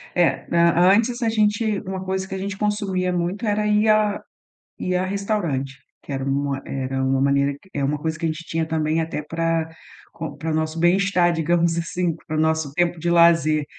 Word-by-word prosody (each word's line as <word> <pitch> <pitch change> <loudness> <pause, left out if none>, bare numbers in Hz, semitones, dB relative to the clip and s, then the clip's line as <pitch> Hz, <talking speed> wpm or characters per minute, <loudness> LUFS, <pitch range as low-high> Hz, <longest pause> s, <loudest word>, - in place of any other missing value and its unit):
Eh, 175 -2 +2
an 170 +2 +4
antes 240 +2 0
a 230 - +2
gente 215 -1 +1
uma 190 0 -4
coisa 190 0 -3
que 195 - -5
a - - -3
gente 200 +1 -4
consumia 200 -3 -1
muito 180 +6 -2
era 210 0 0
ir 210 +1 +3
a 215 -1 +2 0.6
ir 180 0 -1
a 185 +1 +1
restaurante 185 -10 -2 0.3
que 140 - -6
era 135 0 -3
uma, 140 0 -1
eh, 135 -1 -4
era 130 0 -2
uma 135 0 +1
maneira 140 0 +2
que 190 - -22
é 140 - -2
uma 145 +2 0
coisa 160 0 -3
que 165 - -3
a 160 - +1
gente 160 +2 -6
tinha 165 0 -1
também 160 0 0
até 160 -2 -3
para 165 0 -1 0.4
com 160 -3 -6
para 160 +2 -3
o - - -1
nosso 160 +1 -2
bem 175 +2 +4
estar, 185 -3 +2
digamos 170 +1 +1
assim, 170 0 -1
para 155 0 -2
o - - +1
nosso 160 -2 +1
tempo 175 +1 +1
de 170 +2 -1
lazer. 165 -3 +4
170 Hz, 220 wpm, -22 LUFS, 155-190 Hz, 0.6 s, an